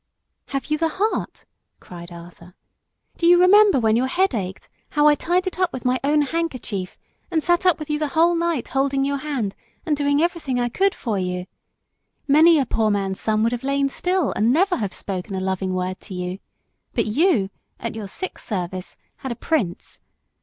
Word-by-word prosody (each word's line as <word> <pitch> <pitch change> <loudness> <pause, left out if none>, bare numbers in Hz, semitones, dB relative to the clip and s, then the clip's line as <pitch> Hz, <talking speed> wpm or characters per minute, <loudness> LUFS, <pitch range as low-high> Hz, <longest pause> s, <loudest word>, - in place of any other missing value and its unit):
"Have 275 -1 -3
you 305 - +1
the 325 0 +2
heart?" 425 +3 -2 0.3
cried 175 -1 -11
Arthur. 170 +1 -13 0.6
"Do 335 - +2
you 350 0 +7
remember 395 -3 +6
when 220 -2 +3
your 250 +3 +2
head 370 +4 +1
ached 190 -4 -4 0.2
how 295 -1 +2
I 300 - +7
tied 350 +5 0
it 370 0 -4
up 365 -2 +2
with 255 - -7
my 250 +1 +2
own 295 +1 +3
handkerchief, 260 - -3 0.3
and 325 -4 0
sat 350 +1 +2
up 360 - +4
with 305 - -7
you 300 0 -1
the 305 - 0
whole 330 +4 +3
night 335 -5 -1
holding 275 0 +1
your 280 0 0
hand 265 -9 -3 0.3
and 310 -4 +1
doing 285 0 +1
everything 320 -6 0
I 240 0 0
could 390 +10 +1
for 215 -5 -2
you! 180 0 -3 0.8
Many 315 +4 +6
a 275 - +2
poor 220 -2 +1
man's 195 -2 -1
son 215 0 +1
would 230 - +2
have 245 -1 -3
lain 275 0 0
still 360 +2 0
and 220 +3 +2
never 360 +6 +2
have 205 -4 -2
spoke 185 +1 -5
a - - -5
loving 190 0 -2
word 185 0 -3
to 190 - -9
you; 180 +1 -4 0.6
but - - +1
you, 220 - +2 0.3
at 230 - -4
your 220 -2 -6
sick 375 - -6
service, 185 -2 -5 0.2
had 265 - -5
a - - -3
prince. 230 - -2
270 Hz, 195 wpm, -22 LUFS, 200-330 Hz, 0.8 s, you